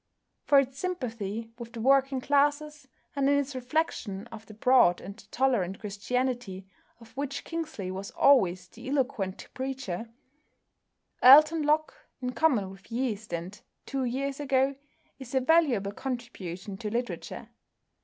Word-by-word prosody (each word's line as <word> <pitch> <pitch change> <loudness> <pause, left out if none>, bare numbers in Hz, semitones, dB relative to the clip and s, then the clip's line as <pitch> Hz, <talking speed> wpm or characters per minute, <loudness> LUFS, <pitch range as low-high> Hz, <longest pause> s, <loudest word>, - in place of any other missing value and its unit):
For 285 - +5
its 270 0 +2
sympathy 230 - -4
with 235 -1 -8
the 235 - -7
working 270 +2 +3
classes, 290 +1 +1 0.3
and 275 -1 +2
in 285 - +4
its 285 0 -1
reflection 250 -7 -2
of 220 - -10
the 215 - -12
broad 220 -6 +4
and 195 +1 -9 0.2
tolerant 225 -8 +1
Christianity 210 -1 -3 0.3
of 225 0 -17
which 280 0 -4
Kingsley 310 - -5
was 195 +1 -6
always 185 -10 +3
the 235 +7 -10
eloquent 250 -9 -2
preacher, 260 -6 -4 1.1
"Alton 305 +5 +8
Locke," 305 +1 +1 0.3
in 250 -1 -3
common 240 -8 +1
with 195 +2 -16
"Yeast" 225 -4 -2
and 175 +4 -5 0.2
"Two 270 -1 -2
Years 270 +3 -2
Ago," 270 -1 +2 0.5
is 265 -1 -8
a - - +5
valuable 260 -9 +3
contribution 205 -7 -6
to 215 -1 -4
literature. 240 +3 -4
250 Hz, 135 wpm, -28 LUFS, 205-275 Hz, 1.1 s, Alton